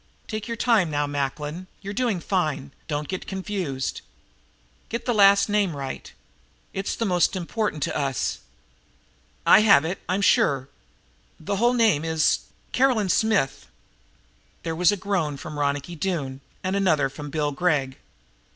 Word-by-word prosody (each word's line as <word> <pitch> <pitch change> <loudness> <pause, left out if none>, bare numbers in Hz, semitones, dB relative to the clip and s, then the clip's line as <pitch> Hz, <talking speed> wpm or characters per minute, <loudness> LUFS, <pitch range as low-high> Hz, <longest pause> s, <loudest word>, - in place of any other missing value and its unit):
"Take 215 0 -4
your 230 -1 -4
time 220 -8 +3
now, 145 -1 0
Macklin, 145 +5 -3 0.2
you're 200 +1 -5
doing 225 -4 0
fine. 150 -8 -1 0.2
Don't 150 -2 -2
get 185 - -5
confused. 185 -9 -3 0.9
Get 235 +1 -4
the 245 - +1
last 200 -1 +6
name 205 -6 +1
right. 135 -1 -6 0.6
It's 195 +1 -2
the 230 - -1
most 180 -1 +2
important 185 -3 -2
to - - -2
us." 135 -3 -1 1.1
"I - - +8
have 200 -8 +6
it, 180 +4 -3
I'm 190 +2 +1
sure. 135 -7 +3 0.7
The 195 +6 -2
whole 240 +4 +3
name 220 -11 +3
is 160 -1 +2 0.3
Caroline 250 -7 +2
Smith." 205 -10 +1 1.0
There 165 -1 -3
was 175 +2 +4
a 205 - -1
groan 180 -7 -1
from 150 +1 -7
Ronicky 145 +3 -1
Doone 150 -7 -3 0.2
and 185 +1 -1
another 165 -8 +3
from 145 +2 -8
Bill 150 0 -1
Gregg. 140 -4 0
175 Hz, 145 wpm, -24 LUFS, 145-200 Hz, 1.1 s, I